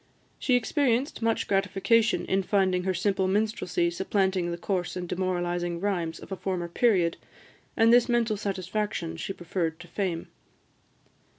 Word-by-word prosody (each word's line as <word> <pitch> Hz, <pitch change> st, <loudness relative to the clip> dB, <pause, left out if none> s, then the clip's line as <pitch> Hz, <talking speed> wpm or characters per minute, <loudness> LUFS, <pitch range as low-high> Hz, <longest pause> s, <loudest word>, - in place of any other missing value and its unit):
She 255 Hz, -, +2 dB
experienced 250 Hz, +1 st, +1 dB
much 225 Hz, 0 st, 0 dB
gratification 200 Hz, +4 st, +2 dB
in 195 Hz, +1 st, +1 dB
finding 185 Hz, -2 st, +1 dB
her 190 Hz, -, +1 dB
simple 190 Hz, +1 st, +1 dB
minstrelsy 190 Hz, -4 st, 0 dB
supplanting 190 Hz, 0 st, 0 dB
the 170 Hz, -, -3 dB
coarse 180 Hz, 0 st, -2 dB
and 180 Hz, -1 st, -4 dB
demoralising 175 Hz, -1 st, -1 dB
rhymes 175 Hz, -4 st, -1 dB
of -, -, -12 dB
a -, -, -1 dB
former 185 Hz, -2 st, -3 dB
period; 175 Hz, -3 st, +2 dB, 0.6 s
and 225 Hz, +1 st, +6 dB
this 245 Hz, +1 st, +5 dB
mental 235 Hz, -2 st, +2 dB
satisfaction 195 Hz, -3 st, -3 dB
she 165 Hz, -, -4 dB
preferred 170 Hz, -3 st, -3 dB
to 180 Hz, -, -11 dB
fame. 175 Hz, -3 st, -3 dB
190 Hz, 140 wpm, -27 LUFS, 175-210 Hz, 0.6 s, and